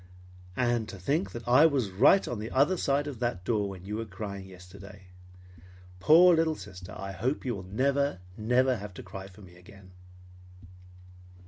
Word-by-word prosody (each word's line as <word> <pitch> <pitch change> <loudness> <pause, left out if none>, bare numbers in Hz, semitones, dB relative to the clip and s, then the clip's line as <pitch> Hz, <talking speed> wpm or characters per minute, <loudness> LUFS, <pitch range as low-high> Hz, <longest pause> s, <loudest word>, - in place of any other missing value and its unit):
"And 120 -3 0
to 95 - -8
think 145 - -1
that 120 0 -9
I 130 +6 +6
was 130 -10 -1
right 125 - +4
on 120 - -4
the 110 +2 -5
other 145 +9 +2
side 145 -4 0
of 145 -5 -7
that 120 -7 -3
door 105 -2 0
when 95 -1 -10
you 105 +2 -4
were 115 - -4
crying 100 -1 -7
yesterday! 95 +1 -14 0.9
Poor 170 - +6
little 160 -1 +1
sister, 90 -4 -11
I 95 0 -6
hope 120 +11 -3
you 125 - -1
will 100 - -6
never, 140 +4 0 0.2
never 125 +4 +1
have 100 -2 -9
to - - -9
cry 95 0 -9
for 95 +2 -16
me 90 -3 -15
again." 95 +1 -16
110 Hz, 180 wpm, -28 LUFS, 95-135 Hz, 0.9 s, I